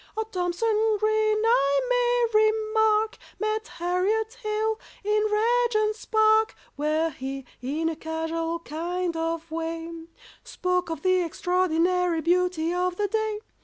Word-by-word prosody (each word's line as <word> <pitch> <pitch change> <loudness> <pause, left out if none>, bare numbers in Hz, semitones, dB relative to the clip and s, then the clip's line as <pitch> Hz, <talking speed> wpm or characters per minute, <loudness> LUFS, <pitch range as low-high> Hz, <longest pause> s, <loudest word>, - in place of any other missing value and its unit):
Oh, 440 - +1
THOMSON 430 +3 0
GREEN, 430 0 +2
I 280 - +3
may 485 -3 +3
remark, 435 0 +1 0.2
Met 430 0 -2
HARRIET 385 +6 0
HALE 435 0 -1 0.2
in 425 +1 +2
Regent's 430 0 +1
Park, 435 0 +3 0.2
Where 310 +3 0
he, 270 -1 -6 0.2
in 300 +6 -1
a 325 - -1
casual 325 +1 -3
kind 340 +2 -3
of 330 0 -3
way, 330 0 -5 0.4
Spoke 360 -1 -1
of 325 -3 -5
the 370 -1 +3
extraordinary 360 -1 +1
beauty 350 -1 +1
of 360 0 0
the 410 +2 0
day. 435 0 -1
365 Hz, 125 wpm, -26 LUFS, 330-435 Hz, 0.4 s, I